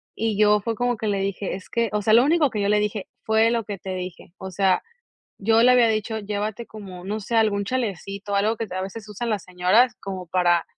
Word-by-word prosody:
y 220 -2 -1
yo, 210 -1 +5
fue 230 +1 -2
como 245 +2 0
que 220 0 -4
le 200 -1 0
dije, 195 0 -2
es 190 - -11
que 230 -1 0
o 210 - 0
sea, 215 +2 +2
lo 235 +2 +7
único 300 0 +3
que 210 -3 -3
yo 200 - +1
le 210 0 +4
dije: 210 -1 -2 0.2
"Fue 220 +1 +3
lo 230 -2 -1
que 205 -1 -5
te 190 0 -6
dije", 180 -2 -7
o 190 - -7
sea, 190 0 +2 0.6
yo 225 +3 +3
le 250 - +7
había 245 -2 +5
dicho: 220 0 -1
"Llévate 210 +2 -4
como, 190 -4 -10
no 210 +2 -3
sé, 220 +3 -4
algún 210 -3 +2
chalecito, 200 -4 -3
o - - +2
algo 215 +3 +2
que 225 - -4
a 185 +1 -3
veces 205 +3 -7
usan 230 +3 -4
las 205 -4 -2
señoras, 185 +7 +3
como 190 -2 -6
para, 175 -1 +2
210 Hz, 245 wpm, -23 LUFS, 195-225 Hz, 0.6 s, lo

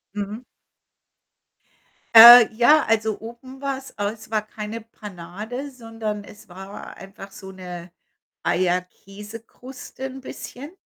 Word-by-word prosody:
Mhm. 210 +4 -6 1.7
Äh, 235 +1 +12
ja, 295 +7 +4
also, 220 -1 0
oben 240 +4 -12
war's 275 -1 -5
es 215 +2 -5
war 215 -1 0
keine 215 +1 -7
Panade, 215 +4 -9
sondern 225 -5 -6
es 210 - -16
war 195 +2 -11
einfach 195 0 -12
so 190 -1 -11
'ne 180 -2 -10 0.5
Eierkäsekruste 205 +9 -5
'n 265 0 -8
bisschen. 275 +3 -10
220 Hz, 105 wpm, -22 LUFS, 195-245 Hz, 1.7 s, Äh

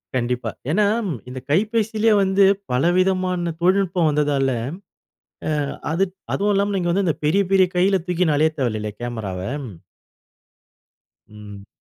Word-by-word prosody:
கண்டிப்பா. 120 -2 -1 0.2
ஏன்னா, 210 +5 +3 0.4
இந்த 130 +1 -6
கைபேசியிலயே 220 +4 +2
வந்து 190 +1 +3 0.3
பலவிதமான 180 +4 +1
தொழில்நுட்பம் 185 -2 +2
வந்ததால, 145 -2 +1 1.0
ஆ - - 0 0.4
அது 180 +4 +2 0.3
அதுவும் 205 +1 +1
இல்லாம, 200 +1 +1
நீங்க 175 -2 0
வந்து 195 +2 +1
இந்த 165 - 0
பெரிய 195 +7 +3
பெரிய 190 -1 +5
கையில 190 +1 +3
தூக்கின்னு 175 -4 +1
அலைய 155 +2 +3
தேவையில்லைல 110 -5 -2
கேமராவ. 110 -6 -4 1.9
ம். 105 -2 -12
175 Hz, 115 wpm, -21 LUFS, 130-195 Hz, 1.9 s, பெரிய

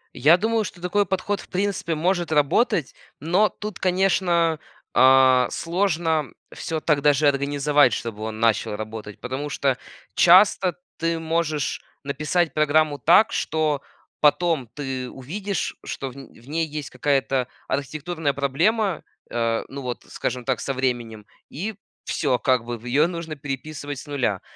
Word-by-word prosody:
Я 155 +7 +6
думаю, 220 +3 +1
что 185 - -8
такой 200 +3 +1
подход 195 +2 -1
в - - -16
принципе 185 -3 -1
может 175 0 0
работать, 150 - +2 0.3
но 180 +8 +2
тут, 210 -3 -7
конечно, 180 -3 +2 0.3
а, 130 -1 +6
сложно 165 -4 0 0.3
всё 165 -2 -3
так 150 -3 +2
даже 145 +1 +4
организовать, 145 -1 +3
чтобы 110 -1 -4
он 110 0 -5
начал 115 -2 +1
работать. 110 -1 -7
Потому 130 +4 -4
что 135 -2 0 0.4
часто 185 0 +5 0.2
ты 165 0 0
можешь 160 -2 -1 0.2
написать 150 +3 0
программу 150 -1 +2
так, 175 - +5
что 155 -3 0 0.4
потом 150 -4 +2
ты 130 -3 -4
увидишь, 190 +9 -4
что 135 - -5
в - - -16
н 135 -1 -10
в 120 - -19
ней 160 +2 -1
есть 150 -1 -6
какая-то 135 -1 0 0.2
архитектурная 155 +2 -2
проблема. 170 - +1 0.3
Э, 115 -1 0
ну, 140 +1 -7
вот, 125 -2 -5
скажем 125 -1 -3
так, 130 -2 0
со 135 - -2
временем. 120 -5 -2 0.2
И 200 +9 -4 0.3
всё, 135 -5 0
как 130 -2 +2
бы, 120 0 -4
в 115 - -16
ее 140 +6 +3
нужно 165 -3 -5
переписывать 145 0 -6
с - - -9
0. 125 -9 -1
150 Hz, 145 wpm, -23 LUFS, 130-170 Hz, 0.4 s, Я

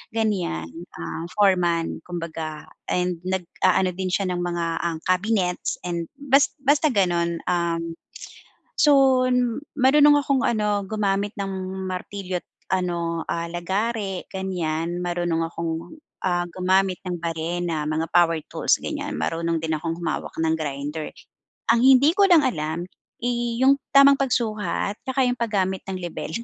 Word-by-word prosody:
ganiyan, 180 - -1 0.2
um, 165 +1 -5
foreman, 180 -5 +2
kumbaga 165 -3 -5 0.2
and 180 -1 0
nagaano 185 0 +1
din 185 +1 -4
siya 185 0 0
ng 175 - -2
mga 175 -1 -1
ang 170 -1 -2
cabinets 185 -1 0
and 170 -2 -3
bas 280 0 +3
basta 290 +3 +3
ganun 175 - +1
um, 170 -1 -1 0.8
so 270 -3 +5 0.6
marunong 290 +3 +6
akong 275 -3 +1
ano, 210 -3 +1
gumamit 205 -1 0
ng 195 -1 -2 0.3
martilyo 185 0 -4
at - - -53 0.2
ano, 170 -3 -1
ah, 170 0 -3
lagare 195 +3 -2
ganiyan, 175 -2 -2
marunong 175 -2 -1
akong, 165 - -4 0.2
ah, 175 -1 0
gumamit 185 0 +1
ng 180 -2 -4
barena, 165 -1 -2
mga 155 +1 -1
power 165 -2 +4
tools - - +2
ganiyan - - -4
marunong 165 0 -1
din 160 -1 -1
akong 165 +1 -3
humawak 170 - -3
ng 160 0 +2
grinder. 150 0 -4 0.6
Ang 235 - +4
hindi 270 +4 +6
ko 395 -1 +4
lang 310 -6 +6
alam, 160 -5 -2 0.3
eh, 240 -1 -1
yung 275 +1 +7 0.2
tamang 275 0 +8
pagsukat 215 -6 -1
at - - -44
saka 260 -1 +1
yung 245 - +1
paggamit 195 -5 0
ng 185 - -3
lebel. 175 -3 -5
180 Hz, 135 wpm, -24 LUFS, 170-220 Hz, 0.8 s, tamang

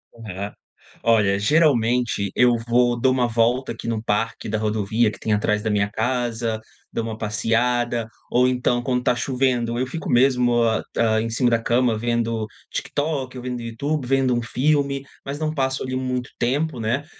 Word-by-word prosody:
Aham. 105 -3 -6 0.5
Olha, 105 -4 +3
geralmente 120 - +2
eu 125 -1 +5
vou 120 0 +3
dou 130 +1 +3
uma 130 -1 +2
volta 120 +3 +1
aqui 115 - -8
no 110 -1 -2
parque 115 +1 -1
da 110 - 0
rodovia, 110 +1 +1
que - - -11
tem 110 - 0
atrás 105 0 +1
da 110 - 0
minha 100 -1 +1
casa. 115 -1 -1 0.3
Dou 115 - -2
uma 110 -1 -5
passeada. 115 +2 0 0.2
Ou, 125 +1 +4
então, 125 -1 +1
quando 125 -1 +1
está 125 - +2
chovendo, 125 -2 0
eu 130 - 0
fico 160 +3 -6
mesmo 125 -1 +4
hã, 110 -1 +1
hã, 110 -1 +3
em 115 - -2
cima 120 +1 +2
da 115 - +3
cama 120 -1 +2
vendo 115 -1 -1 0.3
TikTok, 145 -3 -2
ou 125 - -7
vendo 125 -1 -4
Youtube, 130 +5 -2
vendo 130 -1 +2
um 120 - 0
filme. 140 +2 +1 0.2
Mas 140 +1 -4
não 155 -1 -1
passo 130 -2 -1
ali 130 0 -3
muito 130 -1 -2
tempo, 135 +2 0
né. 120 +6 -1
120 Hz, 180 wpm, -22 LUFS, 115-130 Hz, 0.5 s, eu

